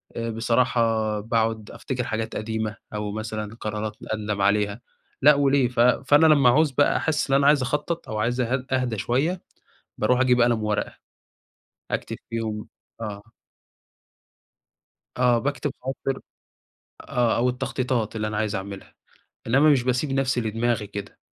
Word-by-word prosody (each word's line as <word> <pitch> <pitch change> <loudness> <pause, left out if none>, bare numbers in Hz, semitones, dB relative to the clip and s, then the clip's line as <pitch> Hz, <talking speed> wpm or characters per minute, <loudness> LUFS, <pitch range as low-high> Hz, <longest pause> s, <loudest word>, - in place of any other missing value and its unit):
آآ 115 0 -3
بصراحة 115 -2 +1
باقعد 110 0 -1
أفتكر 125 -2 -4
حاجات 110 -1 -3
قديمة، 110 0 -3 0.2
أو 105 -1 -3
مثلًا 110 0 -5
قرارات 105 -1 -4 0.2
أندم 105 -2 -2
عليها 100 +2 +1 0.4
لأ، 150 +2 +8
وليه، 140 -2 +3
ف 120 -1 -6
فأنا 135 +5 +5
لمّا 140 -5 +6
أعوز 150 +3 +4
بقى 145 +2 +3
أحِسّ 155 -3 -1
إن - - +5
أنا 140 0 +4
عايز 145 -1 +5
أخطط 150 +5 -2
أو 110 - -3
عايز 120 +3 0
أهد 125 +2 -1
أهدى 125 -4 0
شوية، 150 - 0 0.6
باروح 125 +4 +2
أجيب 125 -1 +4
قلم 120 -2 +3
وورقة، 105 -1 -1 1.0
أكتب - - -3
فيهم 110 -2 -3 0.3
آه. 105 -2 -5 2.0
آه، 125 -1 +4
باكتب 140 0 -2
خواطر 135 +1 -3 0.8
آه، 120 -2 0
أو 125 +2 +2
التّخطيطات 125 -3 -2
اللي 105 -1 -1
أنا 105 - -3
عايز 105 -1 -1
أعملها، 95 0 -7 0.5
إنّما 135 +6 +5
مش 135 -4 +4
باسيب 125 +3 0
نفسي 135 -2 +1
لدماغي 115 0 -1
كده، 100 0 -8
120 Hz, 145 wpm, -24 LUFS, 110-130 Hz, 2.0 s, لأ